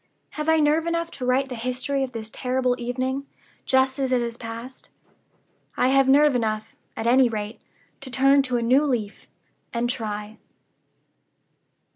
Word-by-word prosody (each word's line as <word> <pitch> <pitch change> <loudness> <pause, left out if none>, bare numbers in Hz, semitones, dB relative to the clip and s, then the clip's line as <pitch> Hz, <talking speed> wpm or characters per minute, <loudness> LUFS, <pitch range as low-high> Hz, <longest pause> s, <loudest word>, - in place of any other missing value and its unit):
Have 305 +1 -3
I 320 0 +4
nerve 305 +2 +2
enough 335 0 -1
to 250 -2 -5
write 265 +2 +2
the - - -5
history 255 +4 -2
of 260 - -4
this 225 -2 -6
terrible 255 0 0
evening, 260 +3 -3 0.4
just 265 +1 +2
as 265 -1 0
it 255 - +3
has 235 -1 -3
passed? 230 +2 -8 0.9
I 255 - +3
have 270 0 +4
nerve 290 0 +5
enough, 220 -2 -2 0.2
at 225 - -3
any 250 +1 +5
rate, 215 0 -5 0.4
to 270 - -10
turn 275 +2 +4
to 245 - +1
a 235 - -1
new 255 +5 +4
leaf, 235 -8 -3 0.4
and 235 0 -1
try." 215 -3 -4
255 Hz, 160 wpm, -24 LUFS, 235-275 Hz, 0.9 s, nerve